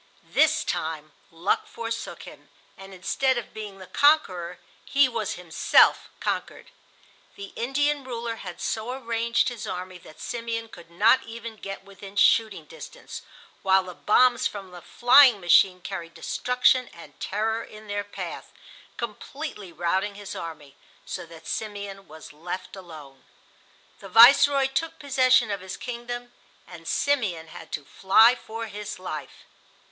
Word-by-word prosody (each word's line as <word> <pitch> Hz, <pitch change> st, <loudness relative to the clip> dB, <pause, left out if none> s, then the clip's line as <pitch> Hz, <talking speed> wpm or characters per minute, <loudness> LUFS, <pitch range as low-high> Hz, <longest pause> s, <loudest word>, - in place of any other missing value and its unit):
This 315 Hz, 0 st, +3 dB
time 155 Hz, -1 st, -3 dB, 0.2 s
luck 165 Hz, +4 st, -1 dB
forsook 230 Hz, 0 st, -6 dB
him, -, -, -13 dB, 0.3 s
and 195 Hz, -1 st, -12 dB
instead 250 Hz, +8 st, 0 dB
of 240 Hz, -, -6 dB
being 210 Hz, -2 st, -7 dB
the 190 Hz, -, -10 dB
conqueror 185 Hz, -, +2 dB, 0.3 s
he 280 Hz, -1 st, +4 dB
was 225 Hz, -5 st, -3 dB
himself 175 Hz, -3 st, +3 dB
conquered. -, -, -4 dB, 0.6 s
The 200 Hz, -1 st, -9 dB
Indian 290 Hz, +4 st, 0 dB
ruler 235 Hz, -2 st, -4 dB
had 180 Hz, -5 st, -8 dB
so 225 Hz, +3 st, -3 dB
arranged 235 Hz, -2 st, 0 dB
his 240 Hz, -3 st, -7 dB
army 185 Hz, 0 st, -6 dB
that 155 Hz, -, -16 dB
Simeon 230 Hz, -1 st, -4 dB
could 170 Hz, -5 st, -14 dB
not 215 Hz, +9 st, +4 dB
even 230 Hz, 0 st, -8 dB
get 195 Hz, -2 st, -8 dB
within 195 Hz, 0 st, -12 dB
shooting 220 Hz, 0 st, +3 dB
distance, 485 Hz, -, -10 dB, 0.4 s
while 190 Hz, 0 st, +4 dB
the 180 Hz, -1 st, -8 dB
bombs 245 Hz, +6 st, +3 dB
from 195 Hz, -3 st, -9 dB
the 175 Hz, -1 st, -11 dB
flying 245 Hz, -, +6 dB
machine 180 Hz, +1 st, +4 dB
carried 170 Hz, -3 st, -7 dB
destruction 250 Hz, +8 st, +1 dB
and 170 Hz, -, -14 dB
terror 220 Hz, +3 st, -1 dB
in 215 Hz, 0 st, -13 dB
their 205 Hz, -1 st, -3 dB
path, 205 Hz, -, -7 dB, 0.5 s
completely 235 Hz, -, -6 dB
routing 190 Hz, +4 st, -1 dB
his 205 Hz, -1 st, -8 dB
army, 150 Hz, -4 st, -8 dB, 0.3 s
so -, -, -6 dB
that 165 Hz, -1 st, -14 dB
Simeon 200 Hz, -2 st, -5 dB
was 155 Hz, -1 st, -12 dB
left 175 Hz, +6 st, -6 dB
alone. 155 Hz, -8 st, -12 dB, 0.8 s
The 195 Hz, -, -11 dB
Viceroy 270 Hz, +6 st, +7 dB
took 325 Hz, +5 st, -2 dB
possession 255 Hz, -5 st, +3 dB
of 200 Hz, -2 st, -3 dB
his 185 Hz, 0 st, -7 dB
kingdom 240 Hz, 0 st, -6 dB, 0.3 s
and -, -, -12 dB
Simeon 200 Hz, -, 0 dB
had 160 Hz, 0 st, -11 dB
to 145 Hz, -, -4 dB
fly 220 Hz, -, +5 dB
for 230 Hz, -2 st, -7 dB
his 210 Hz, -1 st, -7 dB
life. 155 Hz, -6 st, -7 dB
210 Hz, 140 wpm, -25 LUFS, 180-240 Hz, 0.8 s, Viceroy